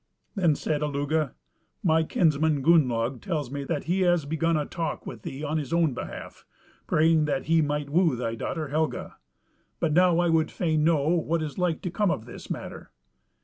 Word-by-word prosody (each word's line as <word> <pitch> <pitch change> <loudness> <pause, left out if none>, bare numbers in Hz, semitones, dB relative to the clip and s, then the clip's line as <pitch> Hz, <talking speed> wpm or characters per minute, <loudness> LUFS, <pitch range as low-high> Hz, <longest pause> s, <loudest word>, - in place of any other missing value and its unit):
Then 175 -7 +2
said 150 +1 -2
Illugi, 150 0 0 0.5
"My 160 -2 +4
kinsman 155 -3 +1
Gunnlaug 130 -6 +3
tells 155 -10 -3
me 140 0 -4
that 150 0 -2
he 185 +3 0
has 175 -4 +3
begun 160 +2 0
a 150 - -1
talk 165 -1 -4
with 115 -4 -8
thee 135 +6 -7
on 155 +1 -1
his 140 -4 -6
own 165 -4 +2
behalf, - - -8 0.4
praying 160 0 +3
that 140 -3 -1
he 165 0 +3
might 145 -1 -2
woo 165 -3 +3
thy 115 -2 -3
daughter 155 +6 -4
Helga; 155 +2 -2 0.6
but 160 -3 +1
now 180 0 +4
I 175 0 +2
would 160 -1 +2
fain 155 -3 0
know 155 -2 +2
what 165 -1 +1
is 150 +3 -5
like 175 -3 0
to 180 - -3
come 205 +1 +1
of 115 -9 -2
this 120 - -11
matter. - - -6
155 Hz, 190 wpm, -26 LUFS, 145-165 Hz, 0.6 s, My